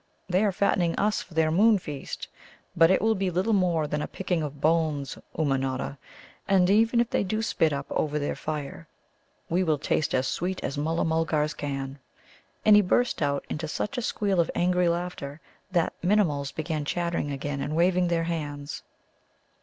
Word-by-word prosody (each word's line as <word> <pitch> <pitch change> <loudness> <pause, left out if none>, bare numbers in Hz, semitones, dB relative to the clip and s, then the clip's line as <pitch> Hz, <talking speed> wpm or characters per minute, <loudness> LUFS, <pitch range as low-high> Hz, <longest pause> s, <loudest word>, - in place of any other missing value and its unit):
They 185 +2 +2
are 205 - +3
fattening 180 -2 +1
us 210 +1 +1
for 170 - -13
their 160 -1 +3
Moon 210 +6 +5
feast. 150 -7 -6 0.5
But 165 -1 +6
it 190 - +3
will 220 0 +4
be 195 -2 -1
little 185 +6 0
more 175 -5 +2
than 150 0 -2
a - - -3
picking 180 -3 -2
of 145 -1 -5
bones, 155 -3 +1 0.2
Ummanodda. 135 -2 -1 0.5
And 190 -2 +4
even 225 +3 +4
if 235 0 +1
they - - +1
do 215 +3 -1
spit 165 -7 +2
up 140 -1 -3
over 150 -1 0
their 145 -1 -2
fire, 145 - -5 0.6
we 180 +3 +1
will 155 -4 +2
taste 150 +1 0
as 130 0 +1
sweet 180 +6 -2
as 140 - -2
Mulla 160 +3 0
mulgars 160 -2 +1
can." 135 -1 -4 0.7
And 215 - +8
he 210 - +7
burst 225 +4 +1
out 140 -1 0
into 155 +1 -4
such 210 - -3
a 250 - -1
squeal 200 -5 0
of 170 - +2
angry 180 0 +2
laughter 170 -4 -4 0.3
the 175 -3 +2
Minimuls 165 -8 +2
began 155 0 -3
chattering 170 0 -1
again 140 0 -3
and 150 +2 -2
waving 180 +1 +3
their 170 -1 +1
hands. 145 -3 -4
165 Hz, 180 wpm, -27 LUFS, 145-185 Hz, 0.7 s, And